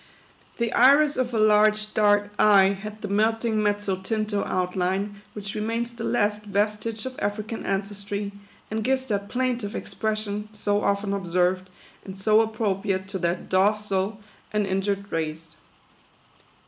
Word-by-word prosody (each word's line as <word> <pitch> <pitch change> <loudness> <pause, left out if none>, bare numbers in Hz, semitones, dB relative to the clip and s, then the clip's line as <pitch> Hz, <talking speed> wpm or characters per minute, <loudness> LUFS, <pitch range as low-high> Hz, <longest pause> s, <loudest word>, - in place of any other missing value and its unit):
^y - - -29
The 235 -1 -1
iris 285 +4 +6
of 255 -1 0
her 235 - -2
large, 215 0 +4
dark 205 -1 +3
eye 200 -2 +6
had 210 +2 -6
the - - -2
melting, 220 +2 +1
mezzotinto 205 +1 -1
outline, 185 +2 -1
which 205 -1 -6
remains 230 +2 -2
the 235 - -7
last 210 -3 +1
vestige 210 +2 -1
of 260 0 -6
African 215 +2 -3
ancestry, 200 +1 -3 0.4
and 220 0 -1
gives 260 +2 +1
that 200 -4 -2
plaintive 245 -4 -1
expression, 215 -1 -3
so 205 -1 0
often 200 0 0
observed, 185 0 0 0.3
and 190 -1 -9
so 215 +3 +4
ap 225 0 -2
propriate 195 -3 -1
to 195 -1 -4
that 175 +1 -1
docile 200 +1 +1 0.3
and 210 -1 +1
injured 195 +1 -1
race. 160 0 -3
205 Hz, 140 wpm, -25 LUFS, 195-215 Hz, 0.4 s, iris